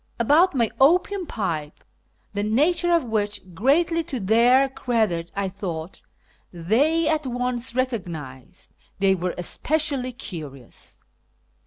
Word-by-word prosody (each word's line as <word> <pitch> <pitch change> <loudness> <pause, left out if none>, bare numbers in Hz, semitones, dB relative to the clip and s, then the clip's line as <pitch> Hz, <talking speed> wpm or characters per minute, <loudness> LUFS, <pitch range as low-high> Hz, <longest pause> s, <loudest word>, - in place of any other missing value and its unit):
About 300 +9 +4
my 230 -4 +1
opium 360 +6 +3
pipe, 165 - -4 0.5
the 205 - -1
nature 305 - +2
of 335 -1 +3
which 210 -3 -2
(greatly 325 - +2
to 275 -7 -4
their 235 +6 +4
credit, 220 -10 -1
I 200 0 -1
thought) 180 -3 -6 0.5
they 270 - +1
at 305 -3 0
once 245 0 -2
recognised, 170 - -5 0.3
they 195 0 +3
were 180 -1 -2
especially 275 - -1
curious. 150 - -8
235 Hz, 115 wpm, -23 LUFS, 185-285 Hz, 0.5 s, About